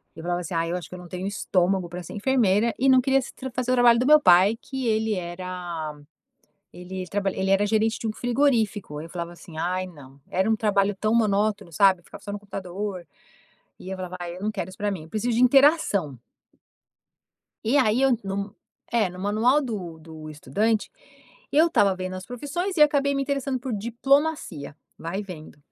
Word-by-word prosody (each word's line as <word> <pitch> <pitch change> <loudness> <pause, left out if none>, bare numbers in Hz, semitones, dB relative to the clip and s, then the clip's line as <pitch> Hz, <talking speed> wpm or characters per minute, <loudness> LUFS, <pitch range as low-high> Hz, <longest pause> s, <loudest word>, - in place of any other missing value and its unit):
eu 160 - -9
falava 175 +1 -1
assim: 175 0 -5
"Ai, 165 0 0
eu - - -1
acho 180 - -6
que - - -8
eu - - -9
não 180 - -11
tenho 185 +2 -5
estômago 190 -2 0
para 175 +1 -7
ser 170 - -9
enfermeira" 225 -1 +2
e 270 +1 +3
não 260 - +7
queria 270 +1 +2
se - - -8 0.2
fazer 255 0 -1
o - - +4
trabalho 240 -1 +6
do 250 - +1
meu 305 +1 +8
pai, 190 -2 +5
que 265 -2 -5
ele 220 0 +1
era 175 -3 -5 0.8
ele 185 +1 -7
trabalha 200 -1 -1
ele 190 0 0
era 195 +1 +3
gerente 220 +1 +1
de - - -3
um 220 - -1
frigorífico, 225 - 0
aí 155 - -6
eu 165 - -15
falava 170 -1 -5
assim: 170 -2 -12
"Ai 180 +3 -1
não", 140 -5 -15
era 190 +3 +1
um - - +4
trabalho 205 -2 +1
tão 215 0 +1
monótono, 210 -4 +1
sabe? 190 +2 +4
Ficava - - -12
só 205 - -7
no 205 - -4
computador 195 -1 -6 0.7
e 185 - -9
eu 190 - -4
falava: 185 -1 -6
"Ai, 175 0 -5
eu - - -10
não 215 - 0
quero 190 -4 -4
isso 185 - -14
pra 205 0 0
mim, 190 -5 -5
eu - - -15
preciso 225 +2 -1
de 245 - +3
interação". 250 - +3 1.5
E 260 +6 +4
aí, 245 -1 +3
eu 270 -1 +4
no 200 +1 -4 0.4
é 225 -5 +2
no 180 0 -11
manual 220 +9 +2
do 190 - -5
do 160 -1 -11
estudante, 205 - -1 0.6
eu 310 +3 +5
estava 200 - +3
vendo 185 0 -4
as 185 0 -7
profissões 300 +10 -4
e 305 - +6
acabei 285 -1 +3
me 275 - 0
interessando 275 -1 -1
por 255 0 -5
diplomacia. 235 - 0 0.2
Vai 190 +5 -4
vendo. 160 -7 -10
200 Hz, 205 wpm, -25 LUFS, 180-240 Hz, 1.5 s, meu